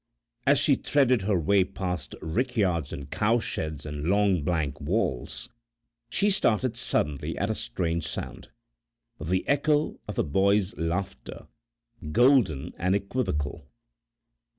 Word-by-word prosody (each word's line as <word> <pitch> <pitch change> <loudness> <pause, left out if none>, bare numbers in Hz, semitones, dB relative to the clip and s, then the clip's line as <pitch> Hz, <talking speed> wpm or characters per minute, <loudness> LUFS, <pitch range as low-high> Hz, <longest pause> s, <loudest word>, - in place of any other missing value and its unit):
As - - +6
she - - +4
threaded 130 -5 +2
her 100 0 +1
way 95 +4 +3
past 90 -5 -4
rickyards 95 - 0
and 70 0 -7
cowsheds 100 - -1
and 75 0 -5
long 100 -2 +3
blank 75 -3 -1
walls, 75 - -2 0.6
she 205 - +2
started 125 - +1
suddenly 95 - -1
at - - 0
a - - +1
strange 85 +5 -2
sound - - -6 0.7
the 90 +4 -1
echo 145 +2 +1
of 105 - -6
a - - +3
boy's 100 +6 +2
laughter, 85 -5 -4 0.7
golden 105 - +3
and 90 +2 +2
equivocal. 90 - -2
95 Hz, 120 wpm, -27 LUFS, 80-115 Hz, 0.7 s, As